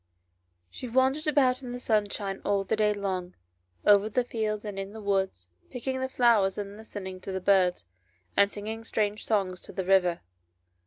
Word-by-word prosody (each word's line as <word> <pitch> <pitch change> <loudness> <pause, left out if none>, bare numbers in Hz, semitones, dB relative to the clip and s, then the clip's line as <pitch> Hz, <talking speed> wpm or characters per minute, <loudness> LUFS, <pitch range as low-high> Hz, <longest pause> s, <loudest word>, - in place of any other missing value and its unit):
SHE 250 - -7
wandered 265 +5 +2
about 265 -3 +3
in 245 -2 -6
the 245 - -5
sunshine 205 -4 -1
all 200 -1 +1
the 195 +3 0
day 210 -1 +3
long, 190 -3 -3 0.5
over 205 +1 +6
the 250 +3 +1
fields 215 -3 -2
and 200 -2 -5
in 195 +1 -6
the 220 - -8
woods, 190 - -1 0.2
picking 260 +1 -3
the 260 0 -2
flowers 230 -7 +3
and 200 -1 -5
listening 195 -4 -8
to 195 - -6
the 190 - -2
birds, 185 - +3 0.5
and 200 0 +4
singing 220 +2 -5
strange 210 -1 -1
songs 195 -4 0
to - - -11
the 190 - -3
river. 180 -2 +3
205 Hz, 175 wpm, -28 LUFS, 195-225 Hz, 0.5 s, over